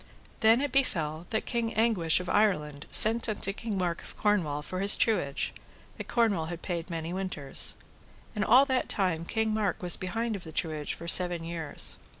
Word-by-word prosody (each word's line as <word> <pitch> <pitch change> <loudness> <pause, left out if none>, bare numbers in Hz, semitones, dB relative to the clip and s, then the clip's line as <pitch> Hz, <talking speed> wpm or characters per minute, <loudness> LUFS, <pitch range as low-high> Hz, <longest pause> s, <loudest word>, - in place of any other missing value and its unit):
Then 225 +3 +4
it 285 -2 -2
befell 165 - -1
that 220 - -2
King 235 -2 -3
Anguish 210 -8 +2
of 180 - -7
Ireland 150 -9 0
sent 230 +1 +6
unto 200 -2 -1
King 215 -1 -5
Mark 175 -2 -2
of - - -12
Cornwall 165 -9 0
for 185 +4 -5
his 200 +1 +5
truage, 175 -12 0 0.4
that - - -8
Cornwall 215 -9 +1
had 170 +1 -8
paid 175 -1 -4
many 165 0 -5
winters. 185 -7 -2 0.6
And 210 - -1
all 260 +5 +5
that 260 -2 -1
time 175 -5 0
King 220 +3 -1
Mark 210 -4 -1
was 175 -1 0
behind 225 +4 -3
of 190 - -8
the 160 - -9
truage 155 -2 -2
for 170 - -10
seven 175 -1 +4
years. 165 -3 -3
185 Hz, 180 wpm, -28 LUFS, 165-220 Hz, 0.6 s, sent